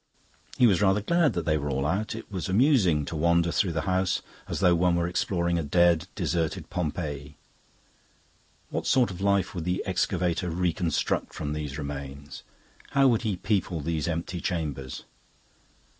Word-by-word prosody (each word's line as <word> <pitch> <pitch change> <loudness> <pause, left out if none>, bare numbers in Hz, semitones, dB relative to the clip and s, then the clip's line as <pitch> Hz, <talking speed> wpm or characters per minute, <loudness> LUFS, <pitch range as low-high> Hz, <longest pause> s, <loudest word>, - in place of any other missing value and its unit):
He 125 - +6
was 100 -5 +4
rather 100 +1 +3
glad 170 +6 +2
that 85 -2 -2
they 75 -1 +2
were 75 0 -3
all 70 0 -1
out; 105 +8 -1
it 115 -1 -9
was 90 -5 -4
amusing 95 - +3
to 85 - -5
wander 85 +2 +2
through 90 -1 +1
the 80 - -1
house 95 +2 0 0.2
as - - -3
though 90 -2 +5
one 85 0 +3
were 85 0 +1
exploring 85 -1 0
a - - -2
dead, 85 +2 +3
deserted 85 -4 -2
Pompeii. 75 -4 -4 1.3
What - - -2
sort 125 -6 +3
of 90 0 -8
life 100 -1 +1
would 85 - -4
the 90 +1 -1
excavator 90 -1 0
reconstruct 85 -1 -1
from 75 0 -3
these 75 -2 -4
remains; 70 -1 -7 0.5
how 135 -1 +4
would 115 -3 +2
he 105 -6 -1
people 95 -4 -1
these 80 +1 -2
empty 85 +1 -3
chambers? 75 -7 -3
85 Hz, 165 wpm, -27 LUFS, 75-95 Hz, 1.3 s, He